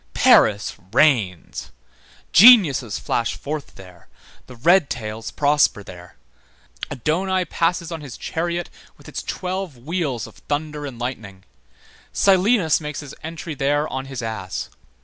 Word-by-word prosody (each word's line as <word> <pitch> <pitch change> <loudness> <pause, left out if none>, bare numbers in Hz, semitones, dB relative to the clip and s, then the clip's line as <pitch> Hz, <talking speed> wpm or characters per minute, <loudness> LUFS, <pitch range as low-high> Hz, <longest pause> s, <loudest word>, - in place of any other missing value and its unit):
Paris 105 -1 +4 0.2
reigns. 110 - +1 0.6
Geniuses 165 - +7
flash 115 0 -2
forth 150 0 -6
there, 90 -3 -15 0.4
the 125 - -12
red 165 +5 +3
tails 110 -1 -5
prosper 145 -7 +2
there. 90 -2 -12 0.7
Adonaï 180 +7 -1
passes 170 0 -1
on 165 -2 -5
his 140 -5 -9
chariot 170 +1 -3 0.3
with - - -17
its - - -5
twelve 185 -5 -4
wheels 140 -3 -3
of - - -14
thunder 150 0 -3
and 130 -4 -9
lightning; 110 -6 -6 0.7
Silenus 190 -4 +3
makes 150 -1 -5
his 145 -2 -10
entry 160 0 -6
there 145 +2 0
on 130 0 -5
his 135 -3 -6
ass. 110 -5 -5
145 Hz, 130 wpm, -21 LUFS, 115-170 Hz, 0.7 s, Geniuses